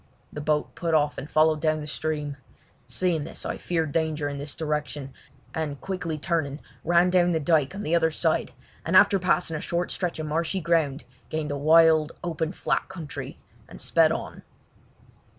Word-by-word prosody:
The 150 - -5
boat 150 0 0
put 165 -2 -1
off 150 -1 +1
and 140 +3 -8
followed 155 0 +3
down 155 -1 +1
the 150 - -6
stream. 150 -1 -3 0.5
Seeing 175 -5 0
this 165 - -6
I - - -3
feared 165 -4 -1
danger 155 -1 0
in 140 -1 -4
this 145 0 -5
direction, 150 -3 -3 0.4
and 150 -3 -3
quickly 175 -5 -3
turning, 150 -3 -1 0.2
ran 175 +2 +4
down 175 -1 +4
the 160 - +1
dyke 155 +1 +2
on 205 - -5
the 160 - -1
other 165 -1 +4
side, 155 - 0 0.3
and - - +4
after 195 - +6
passing 180 -2 +1
a - - -6
short 175 +1 -2
stretch 180 -3 -2
of 155 - -4
marshy 165 +5 -1
ground 160 -4 +1 0.3
gained 155 -1 -2
a - - -1
wild, 160 +1 +5
open 165 -2 -2
flat - - -1
country 170 -6 -7 0.3
and - - -11
sped - - +3
on. - - -5
160 Hz, 180 wpm, -26 LUFS, 150-170 Hz, 0.5 s, after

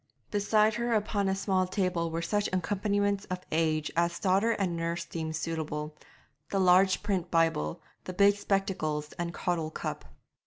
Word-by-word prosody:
Beside 210 +1 +3
her 235 +1 0
upon 205 -2 0
a 190 - +1
small 190 -1 +1
table 180 -3 0
were 165 +1 -3
such 205 +4 0
accompaniments 200 +1 0
of 185 -1 -5
age 155 -1 +1
as 170 0 +1
daughter 195 +4 +2
and 190 -5 -1
nurse 170 +1 -2
deemed 160 -2 -4
suitable 155 -1 -3 0.5
the 195 - 0
large 185 +1 +4
print 190 -4 -1
Bible, 165 - +1 0.2
the 185 - -5
big 200 +2 +5
spectacles 185 -7 -1
and 170 0 -2
caudle 170 -2 -2
cup. - - -5
185 Hz, 155 wpm, -29 LUFS, 165-200 Hz, 0.5 s, big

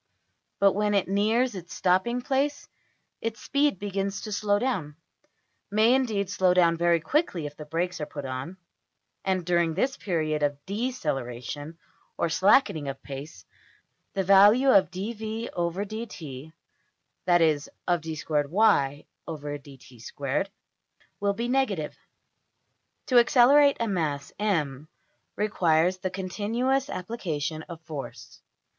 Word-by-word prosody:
But 200 -1 +5
when 210 0 +1
it 195 - +2
nears 220 +6 +2
its 180 -2 -8
stopping 190 +7 +1
place 280 +3 -1 0.5
its 225 -1 -3
speed 285 -5 +1
begins 195 0 -3
to 215 - -6
slow 205 0 +1
down; 195 - -2 0.7
may, 215 +4 +4
indeed, 220 -7 +1
slow 185 -1 +2
down 170 -2 +4
very 170 0 +3
quickly 185 - 0
if 145 0 -7
the 150 - -9
brakes 170 +2 -2
are 150 - -3
put 145 -2 -7
on, 130 +8 -5 0.7
and 185 -2 0
during 170 -2 +1
this 265 +9 0
period 155 -5 -1
of 145 -1 +1
\emph{deceleration} 150 - -4 0.4
or 170 - 0
slackening 185 - +3
of 135 0 -6
pace, 140 - -8 0.7
the 195 - +1
value 205 +8 +6
of~$\dfrac{dv}{dt}$, 200 - -2 0.7
that 175 -1 +4
is, 150 -3 +1 0.2
of~$\dfrac{d^2y}{dt^2}$ 145 - -1 0.7
will 200 0 +1
be 235 +4 -3
negative. 230 - 0 1.1
To 250 -3 +5
accelerate 275 +4 +5
a 230 - 0
mass~$m$ 155 -3 -2 0.5
requires 180 -4 +2
the 185 - -2
continuous 225 +9 -1
application 170 - -3
of 170 -2 -7
force. 155 -4 -8
185 Hz, 115 wpm, -27 LUFS, 155-215 Hz, 1.1 s, value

